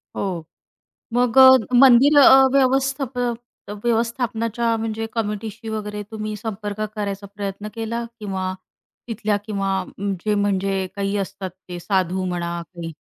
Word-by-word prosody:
हो, 180 -5 -3 0.7
मग 245 0 +1
अ, 260 0 +10 0.3
मंदिर 270 +3 +7 0.3
व्यवस्थापन 265 -2 +1 0.5
व्यवस्थापनाच्या 230 0 0
म्हणजे 225 0 -3
कमिटीशी 220 +1 -4
वगैरे 210 -1 -4
तुम्ही 215 -1 -5
संपर्क 210 -1 -5
करायचा 200 -1 -4
प्रयत्न 200 +1 -5
केला 230 +1 -3 0.2
किंवा 190 -2 -3 0.6
तिथल्या 215 -2 -1
किंवा 195 -3 -1 0.4
जे 210 -1 +1
म्हणजे 195 -1 0
काही 200 0 -1
असतात 195 -1 -5 0.2
ते 175 0 -6
साधू 185 -1 0
म्हणा 170 -1 -3
काही? 170 -1 -8
210 Hz, 115 wpm, -22 LUFS, 195-230 Hz, 0.7 s, अ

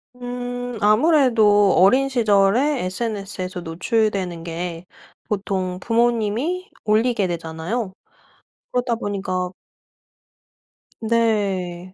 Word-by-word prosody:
음 245 0 -5
아무래도 215 - +4
어린 255 +9 +5
시절에 235 +4 +2
SNS에서 190 -2 -4
노출되는 180 0 -1
게 170 +1 -5 0.4
보통 190 -3 -2
부모님이 240 - 0
올리게 215 -2 +2
되잖아요. 170 +6 -4 0.8
그러다 245 -1 0
보니까 190 -4 -3 1.5
네. 200 -6 0
210 Hz, 200 characters per minute, -21 LUFS, 185-240 Hz, 1.5 s, 어린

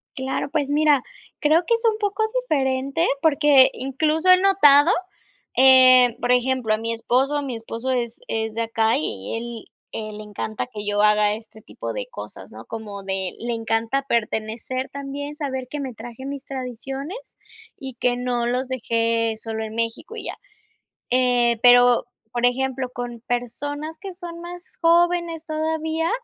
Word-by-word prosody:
Claro. 265 +1 -3
Pues, 295 -3 0
mira, 295 -2 +4 0.4
creo 310 +3 +4
que 470 - +2
es 460 - -5
un 430 - -2
poco 410 0 0 0.3
diferente, 275 +3 +1
porque 295 -4 +5
incluso 310 +6 0
he 365 - +9
notado, 350 -5 +6 0.6
eh, 255 -2 +7
por 245 - +1
ejemplo, 250 -2 +2
a - - +1
mi 230 +1 -3
esposo 265 +5 +1
mi 265 -4 -4
esposo 230 +3 -4
es 240 -2 -2
es 220 -1 -2
de 230 +1 -1
acá 225 0 +1
y 100 - -4 0.6
él 215 -1 -5
le 215 - -8
encanta 210 +3 -5
que 210 -4 -8
yo 205 0 +1
haga 210 0 +4
este 220 0 -11
tipo - - -6
de - - -4
cosas, 475 - -9
¿no? - - -11
Como 210 -3 -7
de 190 -1 -2
le 240 +1 -3
encanta 225 +3 -1
pertenecer 230 +3 -2
también 280 +1 -6
saber 265 -4 -4
que 295 - -5
me 265 -3 -5
traje 240 +3 -9
mis 280 -1 -6
tradiciones 270 - -6 0.6
y 265 -2 -8
que 245 0 +1
no 245 -1 -1
los 250 +2 -1
dejé 230 -2 0
solo 220 0 -5
en 220 0 -6
México 230 - -3
y - - -7
ya. - - -4 0.8
Eh, 245 -2 +3
pero, 245 0 +6 0.3
por 240 0 -2
ejemplo, 260 0 -1
con 245 -1 -6
personas 290 +6 -4
que 390 -1 -7
son 345 -2 -9
más 355 +1 -10
jóvenes 340 -1 +2
todavía 320 +1 -1
255 Hz, 160 wpm, -22 LUFS, 230-295 Hz, 0.8 s, he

